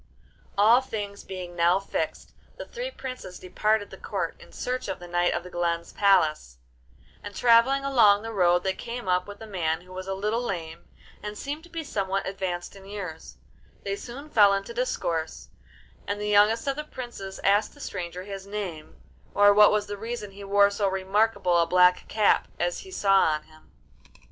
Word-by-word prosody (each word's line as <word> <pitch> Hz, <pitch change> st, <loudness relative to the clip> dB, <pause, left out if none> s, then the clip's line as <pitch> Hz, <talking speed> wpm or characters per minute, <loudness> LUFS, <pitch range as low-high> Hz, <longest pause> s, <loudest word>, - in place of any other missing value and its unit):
All 225 Hz, +5 st, +6 dB
things 205 Hz, -5 st, -6 dB
being 180 Hz, -2 st, -7 dB
now 175 Hz, +2 st, +3 dB
fixed, 195 Hz, -, -4 dB, 0.3 s
the -, -, -7 dB
three -, -, -5 dB
princes 255 Hz, -, -8 dB
departed 210 Hz, +3 st, 0 dB
the -, -, -11 dB
Court -, -, -3 dB
in -, -, -15 dB
search 255 Hz, +1 st, -3 dB
of 190 Hz, -, -3 dB
the 175 Hz, -, -11 dB
Knight 175 Hz, 0 st, +1 dB
of -, -, -2 dB
the 180 Hz, -, -11 dB
Glen's 170 Hz, -1 st, -2 dB
palace, 160 Hz, -, +2 dB, 0.6 s
and 205 Hz, -1 st, -9 dB
travelling 250 Hz, +4 st, +4 dB
along 220 Hz, -6 st, +5 dB
the 225 Hz, 0 st, -5 dB
road 180 Hz, -3 st, +3 dB
they 190 Hz, -, 0 dB
came 235 Hz, +1 st, -7 dB
up 180 Hz, +1 st, +1 dB
with 205 Hz, 0 st, -9 dB
a -, -, -7 dB
man 170 Hz, -5 st, -1 dB
who 185 Hz, +1 st, -14 dB
was 185 Hz, 0 st, -7 dB
a 195 Hz, -, -2 dB
little 210 Hz, +4 st, -1 dB
lame, 170 Hz, -8 st, -5 dB, 0.4 s
and 210 Hz, 0 st, -6 dB
seemed 290 Hz, +6 st, -5 dB
to -, -, -17 dB
be 330 Hz, -1 st, -5 dB
somewhat 195 Hz, -7 st, -2 dB
advanced 190 Hz, -2 st, -4 dB
in 195 Hz, -1 st, -13 dB
years; 180 Hz, -, -7 dB, 0.5 s
they 200 Hz, 0 st, -2 dB
soon 255 Hz, +7 st, -9 dB
fell 205 Hz, -2 st, +6 dB
into 195 Hz, +4 st, -4 dB
discourse, 170 Hz, -10 st, -2 dB, 0.6 s
and 205 Hz, 0 st, -2 dB
the 210 Hz, -, -3 dB
youngest 210 Hz, +2 st, +4 dB
of 275 Hz, 0 st, -1 dB
the 300 Hz, -, -3 dB
princes 240 Hz, -9 st, -8 dB
asked 205 Hz, +5 st, +2 dB
the -, -, -17 dB
stranger 180 Hz, -7 st, -5 dB
his 195 Hz, 0 st, -8 dB
name, 190 Hz, -7 st, -6 dB, 0.4 s
or 205 Hz, 0 st, +7 dB
what 210 Hz, 0 st, +7 dB
was 210 Hz, -1 st, +1 dB
the 205 Hz, 0 st, -6 dB
reason 225 Hz, -1 st, -5 dB
he 200 Hz, +1 st, -11 dB
wore 200 Hz, 0 st, +4 dB
so 200 Hz, 0 st, 0 dB
remarkable 190 Hz, -1 st, +1 dB
a 170 Hz, -, +3 dB
black 180 Hz, +1 st, +4 dB
cap 215 Hz, -2 st, +2 dB
as 175 Hz, 0 st, -1 dB
he 385 Hz, -, -11 dB
saw 195 Hz, -, +3 dB
on 155 Hz, -1 st, 0 dB
him. 155 Hz, 0 st, -21 dB
200 Hz, 190 wpm, -26 LUFS, 180-220 Hz, 0.6 s, or